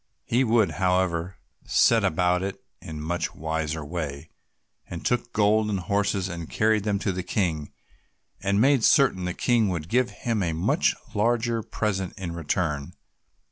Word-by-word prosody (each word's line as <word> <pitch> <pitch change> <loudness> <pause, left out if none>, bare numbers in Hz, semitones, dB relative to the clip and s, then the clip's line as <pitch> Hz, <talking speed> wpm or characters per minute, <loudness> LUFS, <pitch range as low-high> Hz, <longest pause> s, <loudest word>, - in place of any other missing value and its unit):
He 125 +3 +2
would, 110 -7 +3
however, 90 -1 +1 0.3
set - - +4
about 90 +2 +2
it 95 +1 -4 0.2
in - - -10
a - - -6
much 85 +3 -2
wiser 80 -1 -3
way, 75 -2 -5 0.6
and 85 - -7
took 120 -1 0
gold 105 0 +2
and 100 -2 -1
horses 100 0 0
and 85 -3 -6
carried 110 -1 +1
them 105 -2 +1
to 100 0 -1
the 90 0 -3
King, 85 -5 -2 0.7
and 100 0 +1
made 135 0 +4
certain 125 -11 +4
the 90 0 -3
King 115 -4 +2
would 85 -3 -4
give 125 +1 +2
him 115 -3 -2
a 85 -3 0
much 110 - +1 0.2
larger 115 +1 +1
present 100 -4 -2
in 90 -3 -5
return. 80 -3 -2
95 Hz, 160 wpm, -25 LUFS, 85-110 Hz, 0.7 s, set